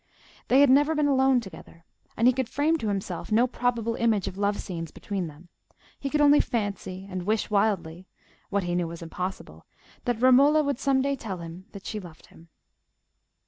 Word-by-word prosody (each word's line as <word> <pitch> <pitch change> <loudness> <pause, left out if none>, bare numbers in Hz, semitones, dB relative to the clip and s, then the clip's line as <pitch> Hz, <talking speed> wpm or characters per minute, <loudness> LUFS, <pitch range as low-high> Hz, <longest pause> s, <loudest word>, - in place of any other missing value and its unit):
They 265 +3 +5
had 285 -2 +6
never 290 +4 +4
been 300 -1 +2
alone 265 -2 +3
together, 165 -4 -13 0.3
and 230 - +2
he 255 - +6
could 260 -2 -2
frame 300 +3 +1
to 220 - -3
himself 195 -1 -4
no 230 +3 +4
probable 240 -2 -1
image 225 -4 +1
of 190 - -5
love 205 +1 0
scenes 165 -4 -6
between 190 0 -4
them: 155 +3 -13 0.5
he 275 - -3
could 295 +1 +1
only 290 0 +6
fancy 200 -5 -3
and 185 -2 -5
wish 215 +4 -1
wildly—what 195 0 -2
he 175 0 -2
knew 175 -1 0
was 170 0 -8
impossible—that 180 - -6
Romola 275 +5 +5
would 280 -3 -2
some 270 -1 +2
day 280 0 0
tell 215 -7 -6
him 170 +2 -9
that 200 - -10
she 215 - -4
loved 175 -5 -13
him. 165 +1 -18
210 Hz, 185 wpm, -26 LUFS, 180-260 Hz, 0.5 s, had